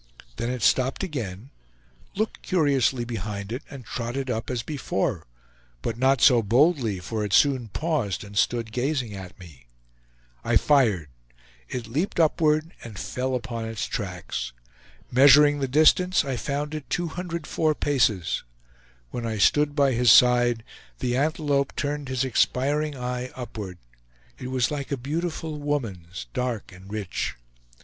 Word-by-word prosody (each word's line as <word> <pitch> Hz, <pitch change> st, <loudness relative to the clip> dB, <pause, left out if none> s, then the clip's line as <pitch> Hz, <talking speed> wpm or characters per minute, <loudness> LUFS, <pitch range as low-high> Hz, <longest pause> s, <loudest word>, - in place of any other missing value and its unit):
Then 115 Hz, -, -2 dB
it 125 Hz, -3 st, -3 dB
stopped 130 Hz, +7 st, +2 dB
again, 125 Hz, -, -5 dB, 0.6 s
looked 215 Hz, +2 st, -2 dB
curiously 140 Hz, -, +1 dB
behind 105 Hz, -3 st, -5 dB
it, 125 Hz, +4 st, -3 dB
and 135 Hz, -4 st, -10 dB
trotted 125 Hz, +3 st, -3 dB
up 110 Hz, -1 st, -3 dB
as 120 Hz, -2 st, -2 dB
before; 145 Hz, -, -2 dB, 0.6 s
but 115 Hz, -, -2 dB
not 130 Hz, +1 st, +2 dB
so 125 Hz, -4 st, +6 dB
boldly, 120 Hz, -, +2 dB
for 105 Hz, +5 st, -3 dB
it 100 Hz, -2 st, -3 dB
soon 130 Hz, -2 st, +4 dB
paused 130 Hz, -, -2 dB
and 100 Hz, 0 st, -11 dB
stood 115 Hz, +2 st, +1 dB
gazing 125 Hz, -2 st, -1 dB
at 95 Hz, -2 st, -9 dB
me. 80 Hz, -9 st, -14 dB, 0.8 s
I 115 Hz, 0 st, +3 dB
fired; 110 Hz, -, +3 dB, 0.6 s
it 125 Hz, -2 st, -4 dB
leaped 150 Hz, -, -2 dB
upward 155 Hz, 0 st, +2 dB
and 110 Hz, -4 st, -9 dB
fell 125 Hz, +7 st, -2 dB
upon 120 Hz, -2 st, -4 dB
its 110 Hz, -2 st, -3 dB
tracks. 90 Hz, -, -4 dB, 0.6 s
Measuring 145 Hz, +3 st, +7 dB
the 135 Hz, -, 0 dB
distance, 160 Hz, +5 st, +4 dB
I 135 Hz, -2 st, -2 dB
found 145 Hz, +4 st, -3 dB
it 155 Hz, -3 st, -6 dB
204 170 Hz, -2 st, -1 dB
paces. 115 Hz, -, +1 dB, 0.7 s
When 120 Hz, -1 st, -3 dB
I 110 Hz, -1 st, -2 dB
stood 145 Hz, +8 st, +3 dB
by 140 Hz, -2 st, +4 dB
his 120 Hz, -1 st, +4 dB
side, 120 Hz, -2 st, +5 dB, 0.3 s
the 125 Hz, -1 st, -1 dB
antelope 145 Hz, -1 st, 0 dB
turned 145 Hz, -1 st, -3 dB
his 130 Hz, 0 st, 0 dB
expiring 140 Hz, +3 st, +1 dB
eye 125 Hz, 0 st, -3 dB
upward. 105 Hz, -7 st, -7 dB, 0.6 s
It 125 Hz, -, -5 dB
was 130 Hz, 0 st, 0 dB
like 145 Hz, -2 st, -4 dB
a 140 Hz, -, 0 dB
beautiful 155 Hz, +3 st, -3 dB
woman's, 100 Hz, -, -3 dB
dark 125 Hz, -5 st, -3 dB
and 95 Hz, +1 st, -13 dB
rich. 105 Hz, -4 st, -3 dB
125 Hz, 140 wpm, -25 LUFS, 110-145 Hz, 0.8 s, Measuring